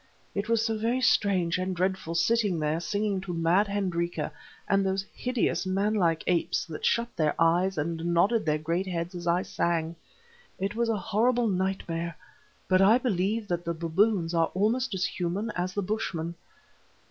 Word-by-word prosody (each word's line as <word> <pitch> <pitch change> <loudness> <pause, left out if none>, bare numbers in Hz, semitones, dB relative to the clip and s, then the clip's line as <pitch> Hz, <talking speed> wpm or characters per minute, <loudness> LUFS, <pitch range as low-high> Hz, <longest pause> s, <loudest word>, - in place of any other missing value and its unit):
It 205 +2 -3
was 230 -1 +2
so 225 -1 0
very 235 +4 +1
strange 185 -8 +2
and 185 0 -2
dreadful 185 -2 -1
sitting 205 0 +2
there 155 +1 0
singing 200 +2 -1
to 180 -2 -5
mad 170 +5 +3
Hendrika 180 -4 -2 0.4
and 195 0 +3
those 190 0 -1
hideous 250 -2 0
man 200 +3 +1
like 170 -6 +1
apes 175 -2 +1
that 160 -2 -8
shut 235 0 +1
their 155 -2 +1
eyes 175 +3 +2
and 165 +2 -2
nodded 180 +7 +2
their 155 -1 +1
great 170 +5 -2
heads 175 0 -3
as 175 -1 -6
I 175 +2 +2
sang. 165 -1 -1 0.6
It 195 +2 -2
was 235 +1 0
a 225 - +1
horrible 230 +5 +1
nightmare; 180 -4 -2 0.5
but 185 0 +4
I 210 +5 +6
believe 215 -2 -1
that 175 -1 -1
the 170 0 -2
baboons 170 +2 +1
are 165 -1 +3
almost 225 +4 +1
as 180 -1 0
human 180 +5 -2
as 180 +1 -2
the 205 - 0
Bushmen. 175 -5 -2
185 Hz, 170 wpm, -28 LUFS, 170-210 Hz, 0.6 s, I